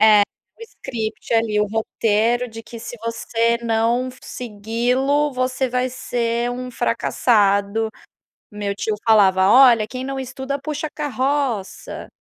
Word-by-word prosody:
É, 215 -1 +7 0.4
o - - -11
script 230 - -5
ali, 220 -2 +2
o 210 - +2
roteiro 225 +2 0
de 225 0 -9
que 225 +1 -10
se 240 +1 -8
você 230 0 0
não 230 +2 +1
segui-lo, 250 +6 -1
você 255 +1 -1
vai 250 +1 0
ser 240 -1 -2
um 250 +1 -5
fracassado 205 -2 +1 0.6
meu 205 -1 -3
tio 210 +2 -2
falava: 190 -4 +5
"Olha, 245 -4 +7
quem 255 0 -5
não 270 0 -3
estuda 265 +2 -4
puxa 305 +2 -3
carroça.". 270 -7 -2
235 Hz, 130 wpm, -21 LUFS, 220-255 Hz, 0.6 s, É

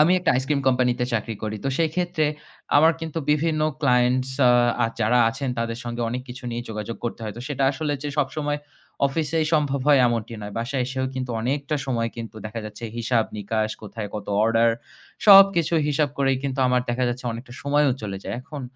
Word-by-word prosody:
আমি 160 +4 +6
একটা 180 - +1
ice 130 - -3
cream 140 -2 +1
company 125 -1 +3
তে 125 - +2
চাকরি 115 0 -1
করি। 110 0 -3
তো 135 - +1
সেই 165 -1 +2
ক্ষেত্রে 175 -3 0 0.5
আমার 160 +3 +6
কিন্তু 165 0 -4
বিভিন্ন 155 +1 +1 0.2
clients 125 -1 +2 0.2
আ 120 -1 +4 0.2
যারা 115 +3 +3
আছেন 135 +4 -4
তাদের 115 0 -2
সঙ্গে 120 0 -3
অনেক 125 +2 -3
কিছু 125 +1 -9
নিয়ে 120 0 -3
যোগাযোগ 110 +1 -5
করতে 120 - -4
হয়। 105 - -5
তো - - -7
সেটা 140 -2 -2
আসলে 145 +1 -2
যে 145 - -3
সবসময় 145 +1 -1 0.5
office 145 +1 -2
এ - - +3
সম্ভব 145 -3 +2
হয় 145 -2 +7
এমনটি 115 -1 -2
নয়। 105 0 -7
বাসায় 125 +3 -1
এসেও 130 0 -2
কিন্তু 130 -1 -3
অনেকটা 140 +5 -1
সময় 115 -3 0
কিন্তু 115 -1 -7
দেখা 110 +1 -6
যাচ্ছে, 105 +2 -8
হিসাব 115 -1 +1
নিকাশ 110 +1 -1
কোথায় 105 0 -6
কত 105 -2 -5 0.2
order 115 +1 +4 0.6
সবকিছু 195 -5 +7
হিসাব 150 0 +2
করেই 135 -1 +2
কিন্তু 135 -1 -3
আমার 125 0 +3
দেখা 125 +1 0
যাচ্ছে 125 +1 -4
অনেকটা 120 +2 -9
সময়ও 145 -1 +3
চলে 100 -2 -4
যায়। - - -4
এখন 140 0 -8
125 Hz, 200 wpm, -24 LUFS, 115-145 Hz, 0.6 s, হয়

